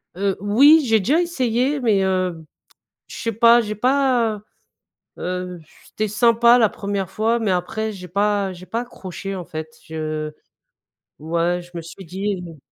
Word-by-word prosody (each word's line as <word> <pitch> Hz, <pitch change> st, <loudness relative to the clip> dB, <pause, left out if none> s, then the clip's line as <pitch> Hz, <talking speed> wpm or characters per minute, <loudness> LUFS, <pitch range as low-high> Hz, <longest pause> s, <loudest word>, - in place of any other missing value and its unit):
Heu, 195 Hz, +1 st, 0 dB
oui 280 Hz, +10 st, +6 dB
j'ai 225 Hz, -2 st, +3 dB
déjà 280 Hz, -, +2 dB
essayé 265 Hz, -4 st, 0 dB
mais, 215 Hz, -6 st, +2 dB
heu, 185 Hz, -4 st, -1 dB, 0.6 s
je -, -, -9 dB
sais 230 Hz, -, -2 dB
pas 230 Hz, +2 st, +6 dB
j'ai 215 Hz, -2 st, -3 dB
pas, 245 Hz, -2 st, +1 dB, 0.8 s
heu, 180 Hz, 0 st, -4 dB
j -, -, -29 dB, 0.2 s
c'était 215 Hz, -, -2 dB
sympa 235 Hz, +3 st, +4 dB
la 230 Hz, -3 st, +5 dB
1re 200 Hz, -2 st, -4 dB
fois 225 Hz, +3 st, +1 dB
mais 220 Hz, -4 st, 0 dB
après 215 Hz, +5 st, -2 dB
j'ai 185 Hz, -3 st, -9 dB
pas 200 Hz, +1 st, 0 dB
j'ai 180 Hz, 0 st, -12 dB
pas 230 Hz, -, -3 dB
accroché 195 Hz, -4 st, -7 dB
en 180 Hz, -2 st, -6 dB
fait 155 Hz, 0 st, -6 dB, 0.2 s
je 155 Hz, -1 st, -4 dB, 0.9 s
ouais 170 Hz, +3 st, -1 dB
je 175 Hz, -, -16 dB
me 170 Hz, -, -5 dB
suis 170 Hz, +4 st, -11 dB
dit 190 Hz, +3 st, -3 dB
mmh 170 Hz, -3 st, -10 dB
200 Hz, 165 wpm, -21 LUFS, 180-230 Hz, 0.9 s, oui